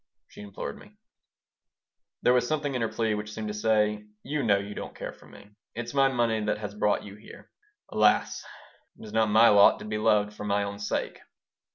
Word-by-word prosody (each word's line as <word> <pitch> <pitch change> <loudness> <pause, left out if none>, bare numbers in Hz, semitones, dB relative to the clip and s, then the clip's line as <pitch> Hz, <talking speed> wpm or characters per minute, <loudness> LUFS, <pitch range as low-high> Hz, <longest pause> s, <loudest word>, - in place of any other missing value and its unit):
she - - -13
implored 100 -1 -7
me - - -17 1.3
There 125 - +5
was 125 -1 +2
something 150 -1 -1
in 125 - -2
her 115 - +1
plea 110 -1 -1
which 105 0 -4
seemed 110 0 -5
to - - -3
say: 105 -1 +1 0.2
"You 150 0 -2
know 105 -6 +3
you 100 +1 -6
don't - - -7
care - - -6
for - - -18
me. 100 - -16 0.2
It's 120 +2 -5
my 135 -1 +4
money 120 -4 0
that 105 0 0
has 105 -1 -6
brought 105 0 0
you 100 - -10
here. 105 +2 -14 0.4
Alas! - - +2 0.6
It - - -10
is 105 - -11
not 110 -1 +2
my 110 +2 +6
lot 100 -1 +6
to - - -9
be 105 0 -3
loved 105 -1 +2
for 105 - -8
my 100 0 0
own 100 0 -5
sake." 105 - -3
105 Hz, 210 wpm, -27 LUFS, 105-115 Hz, 1.3 s, my